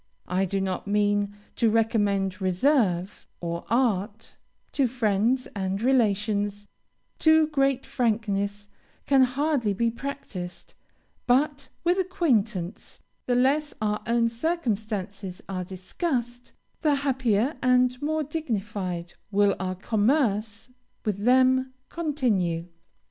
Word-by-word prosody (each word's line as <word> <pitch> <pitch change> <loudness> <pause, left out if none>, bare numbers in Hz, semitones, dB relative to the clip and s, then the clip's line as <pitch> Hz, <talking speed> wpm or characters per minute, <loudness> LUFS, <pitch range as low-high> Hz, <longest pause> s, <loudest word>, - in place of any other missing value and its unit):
I 185 +2 +1
do 195 +1 -1
not 190 0 -3
mean 205 0 +1 0.2
to 230 - +3
recommend 205 -4 +1
reserve, 190 - +1
or 170 0 -4
art; 225 -3 0 0.4
to 275 -3 +2
friends 235 +1 +1
and 190 0 -2
relations, 205 -4 +1 0.5
too 315 0 +5
great 275 -3 +1
frankness 205 -4 -1 0.4
can 275 -1 +4
hardly 260 -3 +1
be 230 +4 +1
practised; 225 -9 -7 0.5
but, 275 +2 +2
with 350 +2 +2
acquaintance, 230 - -1 0.3
the 245 - +2
less 285 +4 +2
our 210 -1 -1
own 235 0 +3
circumstances 215 - -3
are 185 -2 -3
discussed, 240 - -4 0.3
the 300 -3 +3
happier, 265 -2 +1
and 250 0 +4
the 250 +2 -13
more 315 0 0
dignified 205 - -3 0.2
will 205 -1 +3
our 185 -1 -2
commerce 215 0 0 0.4
with 205 -1 -2
them 260 +1 +4 0.2
continue. 225 - 0
225 Hz, 110 wpm, -26 LUFS, 200-260 Hz, 0.5 s, too